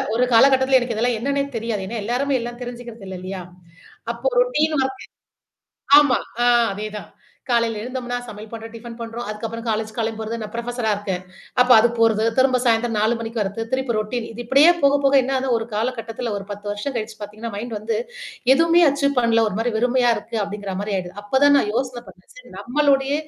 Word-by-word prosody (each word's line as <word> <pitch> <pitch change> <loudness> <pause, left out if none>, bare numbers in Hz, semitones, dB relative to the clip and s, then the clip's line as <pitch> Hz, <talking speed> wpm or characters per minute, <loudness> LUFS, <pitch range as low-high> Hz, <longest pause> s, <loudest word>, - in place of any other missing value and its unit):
ஒரு 250 - +3
காலகட்டத்தில 265 +2 +5
எனக்கு 240 -2 -3
இதெல்லாம் 240 0 +1
என்னன்னே 280 +2 0
தெரியாது. 220 -4 -3
ஏன்னா, 225 0 -4
எல்லாருமே 260 +3 0
எல்லாம் 240 +1 -6
தெரிஞ்சுக்கிறது 235 -4 -9
இல்ல 185 - -6
இல்லயா! 185 -1 -6 0.7
அப்போ - - -1
ரொட்டீன் 315 -11 +1
ஒர்க் 265 0 -3 1.0
ஆமா. 280 -4 +2 0.2
ஆ - - +4 0.3
அதேதான். 210 0 -6 0.4
காலையில 230 -2 +1
எழுந்தோம்னா 245 0 -4
சமையல் 215 -1 -10
பண்றோம், 225 0 -8
டிஃபன் 230 0 -9
பண்றோம். 230 +1 -6
அதுக்கப்புறம் 225 +2 -5
காலேஜ் 220 0 -1
கிளம்பிப் 225 -1 -2
போறது. 220 +1 -3
நான் 210 - -6
புரொஃபஸரா 235 -1 -2
இருக்கேன். 190 -3 -4 0.4
அப்ப 250 0 +4
அது 235 +2 +5
போறது. 225 -1 +3
திரும்ப 260 -1 +4
சாயந்திரம் 230 -1 +2
4:00 220 +3 +2
மணிக்கு 225 0 -4
வர்றது, 205 +3 -2
திருப்பி 260 -3 0
ரொட்டீன் 225 +2 -3
இது 230 +2 -9
இப்பிடியே 280 +7 +6
போக, 280 0 +5
போக 275 - +4
என்ன 265 +2 -3
ஆதுனா 260 0 -1
ஒரு 225 - -5
காலகட்டத்தில 230 0 -3
ஒரு 195 - -6
10 205 0 -6
வருஷம் 210 +7 -4
கழிச்சு 220 -1 -4
பார்த்தீங்கன்னா, 215 +2 -7
மைண்ட் 230 +1 -5
வந்து 215 +2 -2 0.6
எதுவுமே 335 +3 +4
அச்சீவ் 280 -1 0
பண்ணல. 230 -1 +3
ஒருமாரி 225 +4 -2
வெறுமையா 245 +1 +3
இருக்கு 230 - -6
அப்பிடிங்கிறமாரி 200 0 -4
ஆயிடுது. 180 -1 -5
அப்ப 265 +6 0
தான் 285 0 +6
நான் 210 - 0
யோசனை 250 -1 -2
பண்ணேன். - - -18
சரி - - -14
நம்மளுடைய 275 +1 +1
235 Hz, 185 wpm, -21 LUFS, 215-255 Hz, 1.0 s, இப்பிடியே